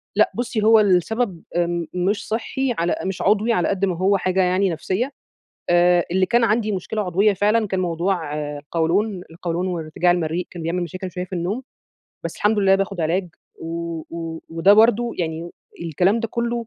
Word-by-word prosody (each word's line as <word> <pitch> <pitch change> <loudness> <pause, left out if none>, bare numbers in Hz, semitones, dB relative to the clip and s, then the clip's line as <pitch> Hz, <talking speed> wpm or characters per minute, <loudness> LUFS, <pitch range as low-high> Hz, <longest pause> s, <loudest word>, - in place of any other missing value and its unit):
لأ، - - +4
بُصّي، 235 -3 -2
هو 220 0 +7
السبب 200 0 +1
آمم 170 -1 0
مش 195 +5 -1
صحّي 245 +3 -1
على 170 +1 +1
مش 190 -1 -3
عضوي 215 +3 +3
على 180 - +1
قد 195 0 +1
ما 180 -3 -2
هو 195 +2 +3
حاجة 185 +1 +1
يعني 185 +2 +2
نفسية. 185 - -2 0.6
آآ 175 0 +4
اللي 185 +1 +3
كان 240 +3 +2
عندي 215 -1 +2
مشكلة 205 +3 -3
عضوية 200 +2 +2
فعلًا 210 +3 +2
كان 190 -1 -1
موضوع 170 -2 -1 0.2
القولون، 175 +6 -1
القولون 170 +2 -3
وارتجاع 175 0 0
المريء 170 0 -1
كان 170 -2 -8
بيعمل 175 +2 -1
مشاكل 185 +2 -6
شوية 180 0 -4
في 185 - -12
النوم، 185 +9 -2 0.6
بس - - -4
الحمد 210 0 +2
لله 195 -1 +5
باخد 195 -1 -1
علاج، 175 +3 0 0.3
و 165 0 -4
و 165 -1 -5
وده 165 +5 +4
برضه 230 +2 +4
يعني 165 0 -3 0.3
الكلام 180 +7 +1
ده 230 - -2
كلّه 235 +1 -2
185 Hz, 175 wpm, -22 LUFS, 170-210 Hz, 0.6 s, هو